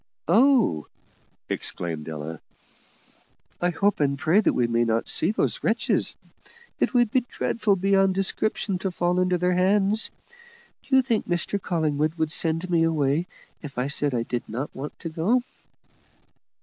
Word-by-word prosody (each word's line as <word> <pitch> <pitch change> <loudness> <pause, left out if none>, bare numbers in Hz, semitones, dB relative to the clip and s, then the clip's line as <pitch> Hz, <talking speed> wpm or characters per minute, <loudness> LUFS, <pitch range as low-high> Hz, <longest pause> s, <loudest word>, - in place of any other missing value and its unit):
"Oh!" 225 - +3 0.6
exclaimed 80 -2 -3
Ella, 80 +1 -6 1.2
"I 175 - +2
hope 200 +4 0
and 140 -1 +1
pray 160 +8 +3
that - - +2
we 120 - +1
may 115 0 +1
not 115 0 0
see 160 - +2
those 215 - -1
wretches; 225 +1 +1 0.6
it - - 0
would 240 -3 +3
be 260 - +4
dreadful 215 -3 0
beyond 195 0 +2
description 195 0 0
to 190 - -2
fall 175 0 0
into 180 0 +2
their 180 +1 +1
hands. 195 +3 +2 0.8
Do 265 - +3
you 265 - +5
think 230 -4 -1
Mr 175 +3 0
Collingwood 155 -3 -1
would 160 -2 -1
send 165 +2 0
me 170 -2 +2
away 160 0 +1 0.3
if 140 -4 -9
I 125 - 0
said 140 -1 0
I 115 - 0
did 120 0 -4
not 125 +7 -5
want 140 +3 -7
to 165 - -4
go?" 195 +11 +1
175 Hz, 155 wpm, -25 LUFS, 140-195 Hz, 1.2 s, you